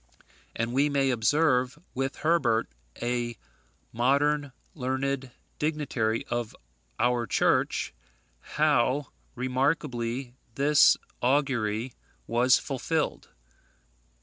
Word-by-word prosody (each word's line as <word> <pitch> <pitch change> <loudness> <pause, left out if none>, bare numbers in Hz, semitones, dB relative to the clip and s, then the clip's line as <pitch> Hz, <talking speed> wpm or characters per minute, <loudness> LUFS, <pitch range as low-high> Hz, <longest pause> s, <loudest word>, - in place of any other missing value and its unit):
And 115 +1 -2
we 140 +3 +3
may 135 -2 +2
observe, 125 +1 +2 0.2
with 135 +1 -2
Herbert, 135 -9 +2 0.4
a 120 -1 -2 0.6
modern 140 +4 +2 0.2
learned 135 -1 -2 0.3
dignitary 140 -8 -1
of 120 -2 -3 0.4
our 120 -1 +1
Church, - - +1 0.5
how 145 - +1 0.3
remarkably 130 -1 -1 0.2
this 145 +1 +5 0.2
augury 125 -4 0 0.3
was 120 +2 +4
fulfilled. 150 +3 -2
130 Hz, 80 wpm, -27 LUFS, 120-145 Hz, 0.6 s, this